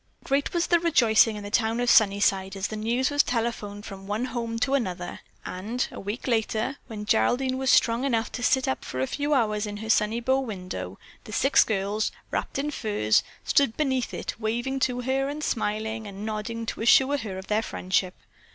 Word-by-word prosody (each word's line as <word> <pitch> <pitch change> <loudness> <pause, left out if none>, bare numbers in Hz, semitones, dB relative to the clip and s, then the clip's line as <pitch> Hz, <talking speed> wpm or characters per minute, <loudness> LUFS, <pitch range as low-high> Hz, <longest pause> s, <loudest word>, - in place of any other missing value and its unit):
Great 275 +1 0
was 345 -1 +1
the 345 - +3
rejoicing 235 -9 +4
in 210 - -7
the 205 - -7
town 225 +1 +1
of 245 - 0
Sunnyside 200 -3 +3
as 195 0 -2
the 215 - -5
news 235 +5 0
was 290 0 +5
telephoned 225 -5 -3
from 195 -1 -9
one 210 +4 -1
home 235 -2 -3
to 265 +4 0
another, 180 -9 -2 0.3
and 220 +7 -3
a - - -8
week 205 +4 -5
later, 230 +2 0
when 215 -3 -6
Geraldine 255 - +2
was 265 -1 0
strong 235 +1 +4
enough 235 -5 0
to 245 - -5
sit 260 +2 +2
up 130 - -1
for 130 - -5
a 130 - +2
few 290 - -1
hours 215 -4 +1
in 205 0 -5
her 220 +1 -1
sunny 220 +1 +2
bow 260 +3 +2
window, 180 - -5 0.3
the - - -9
six 270 +6 +4
girls, 205 0 -1 0.2
wrapped - - -2
in 290 +2 -1
furs, 205 - +1 0.2
stood 275 -6 +2
beneath 265 -5 0
it - - -5
waving 240 +5 -1
to 250 -1 0
her 265 +2 0
and 300 +1 -5
smiling 220 -1 -2
and 200 +1 -7
nodding 220 +1 -4
to - - -5
assure 265 +5 +5
her 200 -6 -5
of 190 - -7
their 210 +2 +1
friendship. 185 -3 -1
225 Hz, 200 wpm, -26 LUFS, 205-260 Hz, 0.3 s, was